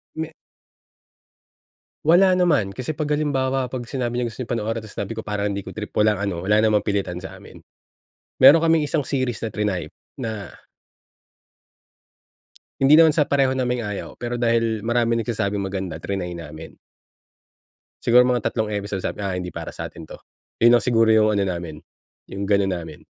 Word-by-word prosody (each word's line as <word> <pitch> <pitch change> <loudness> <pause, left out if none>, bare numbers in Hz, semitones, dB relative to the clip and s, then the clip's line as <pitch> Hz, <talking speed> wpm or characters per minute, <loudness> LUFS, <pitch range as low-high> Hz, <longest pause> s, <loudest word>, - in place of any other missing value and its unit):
Me 160 0 -4 1.7
Wala 180 +4 +5
naman. 145 - +2
Kasi 130 +4 -3
'pag 155 0 -3
halimbawa, 135 -3 0
'pag 125 -2 -4
sinabi 120 -2 -2
niya 125 - 0
gusto 115 +2 -7
'yung 115 - -9
panoorin, 115 -1 -2
tas 110 - -11
sinabi 100 +2 -3
ko 110 - -4
parang 105 -1 -2
hindi 100 0 -4
ko 95 - -8
trip 105 0 -7
walang 105 -1 +3
ano, 100 -4 -3
wala 105 +2 +3
namang 105 -2 +3
pilitan 95 -4 -2
sa 95 - -9
amin. - - -14 0.8
Meron 145 +5 +8
kaming 160 -2 +3
isang 145 -1 -1
series 130 -5 -2
na 110 - -2
triny, 95 -7 -2 0.3
na 110 -6 -5 2.3
Hindi 145 +4 +6
naman 160 -2 +6
sa 150 - +4
pareho 135 -2 +1
naming 125 -1 -1
ayaw, 105 - -6
pero 120 0 -3
dahil 115 -2 0
maraming 115 -1 +1
nagsasabing 100 -3 -2
maganda, 95 -3 -4
triny 90 +1 -4
namin. 80 -1 -10 1.3
Siguro 125 +1 +6
mga 125 -1 0
tatlong 110 -2 -2
episode 100 -1 -3
sabi, 105 - -4
"Ah 95 -2 -2
hindi 90 -1 -5
para - - -6
sa'tin 80 - -8
'to." - - -10 0.4
'Yun 120 +1 +6
lang 120 - +2
siguro 115 -3 +3
'yung 110 -1 +5
ano 100 - +2
namin, 85 -4 -5 0.5
'yung 100 +1 -4
ganun 100 -2 +2
namin, 80 -4 -6
110 Hz, 170 wpm, -22 LUFS, 100-130 Hz, 2.3 s, Meron